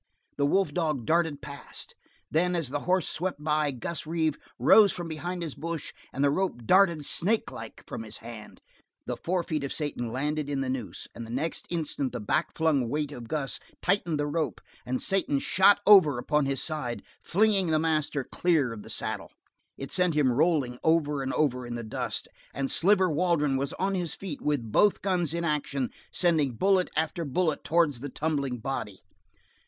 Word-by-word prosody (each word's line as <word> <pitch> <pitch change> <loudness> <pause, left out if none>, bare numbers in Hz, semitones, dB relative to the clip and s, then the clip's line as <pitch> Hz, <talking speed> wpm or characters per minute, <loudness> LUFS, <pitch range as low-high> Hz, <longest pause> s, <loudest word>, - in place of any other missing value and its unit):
The 140 0 +2
wolf 195 +5 +2
dog 155 -8 -1
darted 160 -2 +1
past. 140 -2 -6 0.4
Then 180 +3 +2
as 165 -7 -1
the 145 +2 -2
horse 185 -1 +3
swept 175 -4 -2
by, 150 -1 +2
Gus 140 +5 -4
Reeve 160 -2 0 0.2
rose 210 -3 +7
from 175 -1 -5
behind 175 +2 -4
his 160 -4 -4
bush 165 -1 -5 0.2
and 135 - -1
the 140 - +4
rope 150 -8 -1
darted 170 - +4
snakelike 175 - -2
from 120 -4 -6
his 110 -1 -6
hand. 115 -2 -10 0.4
The - - -3
forefeet 170 -4 -2
of 140 - -3
Satan 130 -6 -3
landed 150 +3 -2
in 140 -1 -1
the 130 - -2
noose, 115 -9 -4
and 115 - -7
the 115 - -9
next 145 +7 -3
instant 155 -6 -2
the 125 - -3
back 155 +9 -1
flung 150 -7 +2
weight 150 +2 -1
of 120 -5 -8
Gus 140 0 -1 0.2
tightened 175 -4 +1
the 145 - +1
rope, 150 +1 -2 0.3
and 130 0 -1
Satan 190 -7 +1
shot 190 +8 +5
over 180 -10 +7
upon 150 +3 +1
his 135 -1 0
side, 150 -7 -3 0.2
flinging 200 -1 +2
the 160 -1 +2
master 155 -3 0
clear 150 -6 +1
of 110 - -8
the - - -12
saddle. - - -3 0.5
It 135 - -6
sent 180 -3 +2
him 140 -4 +3
rolling 135 -3 +1
over 150 -3 +2
and 135 0 -2
over 125 -5 +1
in 120 -1 -5
the 120 - -4
dust, 110 - -3 0.3
and 135 -1 -1
Sliver 190 +1 +4
Waldron 155 -3 +2
was 140 +1 -1
on 195 +1 -1
his 175 -4 -2
feet 180 -7 -6
with 135 -7 -1
both 205 - +3
guns 180 -5 +1
in 170 - -2
action, 140 -4 -1 0.2
sending 160 -7 +2
bullet 190 - +2
after 160 +2 -1
bullet 155 +2 0
towards 160 -5 +2
the 145 +3 -5
tumbling 140 -3 -1
body. 110 -5 -5
150 Hz, 185 wpm, -28 LUFS, 135-170 Hz, 0.5 s, rose